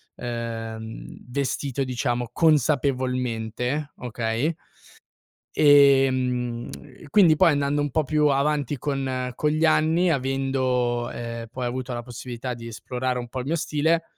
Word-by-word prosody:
ehm, 115 -2 -5 0.2
vestito 140 0 -2
diciamo 120 -2 -2
consapevolmente, 130 -3 0
okay? 120 +5 -1 1.0
Ehm, 130 -4 +4 0.4
quindi 170 -3 +6
poi 170 0 +5
andando 145 0 +1
un 145 - -2
po' 155 +3 +1
più 150 +1 +2
avanti 145 0 +1
con 130 -3 -2
con 150 - +1
gli 155 +2 +2
anni, 160 +3 +3
avendo, 130 -3 0
ehm, 115 -1 -6
poi 125 -1 -4
avuto 125 +1 -3
la 120 - -3
possibilità 125 +1 -6
di 115 0 -10
esplorare 125 +2 -3
un 120 - -6
po' 130 - -5
il 125 - -7
mio 165 - +1
stile, 160 +1 +1
130 Hz, 125 wpm, -24 LUFS, 120-145 Hz, 1.0 s, quindi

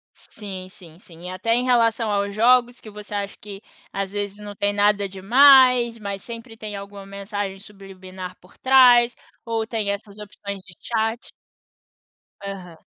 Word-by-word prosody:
Sim, 190 -4 -8
sim, 170 -4 -15
sim. 175 -1 -11
Até 205 +5 -1
em 245 - +1
relação 230 -3 +2
aos 200 0 -1
jogos, 245 +2 +3
que 215 - -12
você 210 0 -10
acha 200 -1 -4
que, 200 -1 -10 0.3
às 195 -1 -3
vezes, 205 -1 -4
não 205 -1 -9
tem 205 0 0
nada 205 0 +2
demais, 245 +4 +5
mas 200 -3 -6
sempre 230 -1 -9
tem 215 -2 -6
alguma 200 0 -9
mensagem 200 0 -5
subliminar 190 -2 -10
por 180 - -22
trás, 245 -2 +6 0.3
ou 225 -1 -1
tem 220 -3 -2
essas 200 0 -7
opções 200 -1 -8
de 190 -1 -16
chat 225 0 -2 1.1
Aham. 185 -4 -8
205 Hz, 155 wpm, -22 LUFS, 195-230 Hz, 1.1 s, trás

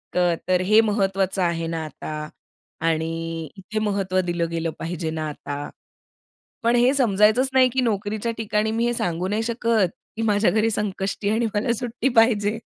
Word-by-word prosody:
तर 180 +1 +1
हे 215 +3 +6
महत्त्वाचं 195 -3 0
आहे 170 -1 0
ना 165 -1 -3
आता 155 0 -6 0.6
आणि 165 0 -2
इथे 195 +3 -4
महत्त्व 195 -3 0
दिलं 170 -1 -1
गेलं 165 0 -1
पाहिजे 165 -1 -3
ना 155 -1 -3
आता. 145 0 -6 0.9
पण 235 +1 +3
हे 245 +2 +4
समजायचंच 220 0 +4
नाही, 260 -1 +5
की 260 +1 0
नोकरीच्या 215 -1 -1
ठिकाणी 215 -1 0
मी 230 +1 +1
हे 240 - +1
सांगू 175 -3 -1
नाही 210 +3 0
शकत 230 -4 +1 0.3
की 225 - -2
माझ्या 210 -1 +3
घरी 220 +1 +2
संकष्टी 200 -1 -2
आहे 215 - +2
आणि 235 - +1
मला 230 +4 +1
सुट्टी 245 +2 -1
पाहिजे, 225 -2 +3
205 Hz, 165 wpm, -23 LUFS, 170-225 Hz, 0.9 s, हे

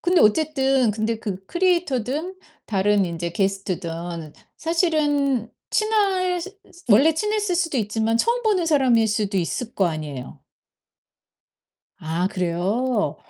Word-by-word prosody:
근데 355 0 +3
어쨌든 265 0 +3
근데 220 +1 -2
그 195 -4 -5
크리에이터든 345 - 0 0.3
다른 200 -1 +2
인제 170 0 -4
게스트든 175 -4 -3 0.2
사실은 295 - +1 0.2
친하실 385 -4 +1 0.4
원래 275 +10 +6
친했을 420 0 0
수도 330 -5 0
있지만 220 +1 0
처음 475 - +1
보는 395 -6 +1
사람일 255 -8 +3
수도 205 -1 -1
있을 225 +7 -3
거 195 - +2
아니에요. 150 -6 -5 1.6
아, 165 +3 -1
그래요? 185 - -1
230 Hz, 260 characters per minute, -23 LUFS, -, 1.6 s, 원래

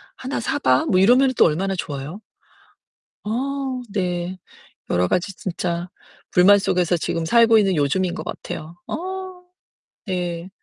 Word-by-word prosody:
하나 260 +2 -4
사 - - -2
봐." 130 0 +3
뭐 185 - +2
이러면은 255 +6 +5
또 - - +6
얼마나 190 +5 0
좋아요? 150 +1 -5 1.1
어, 265 +3 -2
네. 180 -2 -2 0.5
여러 90 +1 +2
가지 180 - 0
진짜 175 -1 -3 0.4
불만 195 +3 +6
속에서 180 -2 +1
지금 165 0 -2
살고 230 +5 +5
있는 195 -3 +2
요즘인 170 +5 +1
것 - - -6
같아요. 160 +3 -7
어. - - -4 1.1
네. 175 -2 -3
185 Hz, 250 characters per minute, -22 LUFS, 170-210 Hz, 1.1 s, 또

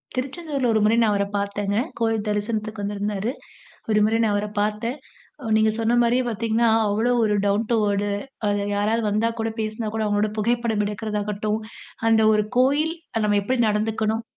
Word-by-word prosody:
திருச்செந்தூர்ல 275 +1 -2
ஒரு 220 - +3
முறை 215 +2 +4
நான் 220 -2 +3
அவர 200 0 +1
பார்த்தேங்க. 200 0 -2 0.2
கோயில் 225 -2 0
தரிசனத்துக்கு 215 0 -2
வந்திருந்தாரு. 205 +2 -2 0.6
ஒரு 210 - +4
முறை 220 +1 +2
நான் 215 -2 +2
அவர 205 +1 -1
பார்த்தேன். 215 +5 -1 0.4
அ - - -8
நீங்க 220 0 +3
சொன்னமாரியே 240 +2 +2
பார்த்தீங்கன்னா, 230 +1 +1 0.2
அவ்ளோ 220 +4 +1
ஒரு 210 -1 +2
டவுன் 205 +3 +1
டூ 235 - +4
வேர்டு 205 0 0 0.4
அ - - +2 0.3
யாராவது 215 +3 +1
வந்தா 215 +3 +1
கூட 225 0 -1
பேசினா 215 0 -3
கூட 220 - 0
அவுங்களோட 205 0 +1
புகைப்படம் 230 -1 +1
எடுக்கிறதாகட்டும், 210 0 -2 0.5
அந்த 225 -1 +4
ஒரு 210 -1 +2
கோயில், 290 +5 +2 0.3
நம்ம 205 -1 +3
எப்பிடி 250 +4 0
நடந்துக்கணும்? 220 +1 0
215 Hz, 160 wpm, -23 LUFS, 210-230 Hz, 0.6 s, முறை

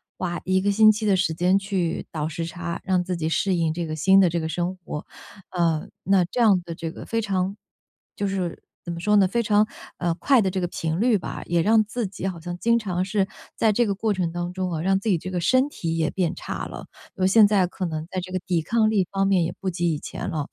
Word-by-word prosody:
花 175 -2 -3
一 185 0 +2
个 200 +1 +2
星 215 +1 +7
期 215 0 -2
的 200 - +4
时 175 -3 +1
间 180 +4 +3
去 195 -4 -2
倒 155 -1 -2
时 165 +1 -4
差， 170 +1 -5
让 185 -2 +1
自 180 0 -3
己 160 -1 -2
适 185 +3 +1
应 165 -2 +1
这 170 0 -3
个 155 - -3
新 190 +5 +5
的 185 -3 +5
这 170 +1 -1
个 160 - -2
生 175 +3 -2
活。 160 -4 -7 0.4
呃， 165 -3 0 0.2
那 195 -1 +4
这 185 - -5
样 205 -6 +5
的 170 -1 -7
这 165 0 -5
个 - - -9
非 230 - 0
常 195 -2 -1 0.6
就 200 - -1
是 185 -3 -3 0.2
怎 170 - -4
么 170 - -6
说 210 +3 +3
呢， 195 -2 +5
非 235 +5 0
常， 210 0 +3 0.3
呃， 175 -1 0
快 265 +9 +3
的 195 - +1
这 185 0 -2
个 175 - 0
频 165 -1 -3
率 235 -2 +4
吧， 180 - -6
也 170 0 +1
让 215 +4 +4
自 215 +1 -3
己 190 0 -7
好 180 -3 -4
像 175 +1 -6
经 235 +5 +2
常 185 -5 -2
是 195 0 0 0.3
在 220 - +3
这 240 +3 +3
个 200 - 0
过 215 +2 0
程 180 -3 -1
当 175 +1 -4
中 185 -1 -2
啊， 160 -2 -2
让 190 +3 +2
自 215 - -2
己 185 - +3
这 185 - -6
个 180 -1 -1
身 255 - +3
体 165 - -3
也 160 -1 +1
变 180 -3 -1
差 - - -5
了。 - - -8 0.3
就 185 -1 +2
现 215 +2 +7
在 200 -3 +3
可 185 +1 -4
能 160 -1 -4
在 185 - -3
这 185 +1 -8
个 185 - -1
抵 175 -3 +1
抗 220 +6 +2
力 205 -4 +2
方 195 0 +1
面 190 -3 +3
也 165 - -2
不 195 - -5
及 170 -2 0
以 150 - -3
前 - - -5
了。 155 -5 -3
185 Hz, 285 characters per minute, -24 LUFS, 170-200 Hz, 0.6 s, 星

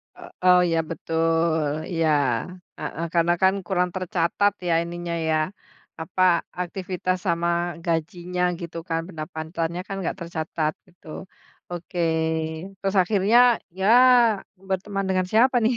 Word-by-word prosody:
E - - -19 0.3
eee, 180 0 +7
ya - - +2
betul. 165 0 0 0.3
Iya, 165 -2 +1 0.7
heeh. 165 +2 -4
Karena 170 0 +3
kan 190 0 +5
kurang 180 -1 +1
tercatat 185 +2 +1 0.2
ya 170 - +2
ininya 170 0 -5 0.2
ya, 155 - +3 0.7
apa, 175 +3 -3 0.4
aktivitas 185 0 -3
sama 170 0 +1 0.4
gajinya 175 +2 -2 0.2
gitu 170 -1 -7
kan, 165 0 0
pendapatannya 160 +1 -4
kan 195 - -4
nggak 180 - -3
tercatat 160 -2 -2 0.2
gitu, 175 -2 -22 0.6
oke. 175 0 -6 0.8
Terus 195 0 -2
akhirnya, 205 +4 +3 0.4
ya, 190 - +1 0.8
berteman 195 +1 -2
dengan 185 -1 +1
siapa 245 +4 +4
nih? 235 +2 +2
175 Hz, 120 wpm, -24 LUFS, 165-190 Hz, 0.8 s, eee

